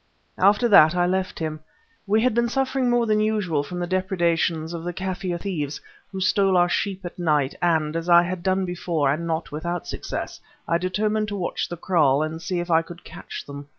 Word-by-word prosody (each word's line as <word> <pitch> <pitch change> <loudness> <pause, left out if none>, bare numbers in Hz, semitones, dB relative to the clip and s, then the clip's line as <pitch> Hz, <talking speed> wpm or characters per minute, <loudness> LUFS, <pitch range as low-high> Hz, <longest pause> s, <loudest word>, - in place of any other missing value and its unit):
After 205 +5 +4
that 170 -6 +7
I 175 0 +2
left 185 +1 -1
him. 155 -1 -4 0.5
We 215 +2 +3
had 250 0 +2
been 235 +1 +1
suffering 265 0 0
more 240 -1 +2
than 215 -1 +2
usual 210 -8 0
from 175 +5 -7
the 175 - -2
depredations 170 -3 0
of 165 -1 -5
the 175 +1 -4
Kaffir 185 -1 -3
thieves, 150 -7 -3 0.3
who 190 - -5
stole 190 0 +3
our 175 0 +4
sheep 195 +1 -2
at 175 - -8
night, 150 -5 +1
and, 160 -3 +1
as 165 +1 -3
I 170 0 +7
had 185 0 -4
done 190 +1 +1
before, 170 -5 -1
and 170 +3 -4
not 165 0 -3
without 170 +3 -4
success, - - -5 0.3
I 170 - +1
determined 210 +4 0
to 205 - -4
watch 185 -3 -3
the 175 - -5
kraal 155 -6 +2
and 160 +1 -5
see 180 0 -2
if 175 0 -4
I 165 0 +5
could 175 +1 -12
catch - - -9
them. 140 0 -9
175 Hz, 210 wpm, -23 LUFS, 165-195 Hz, 0.5 s, that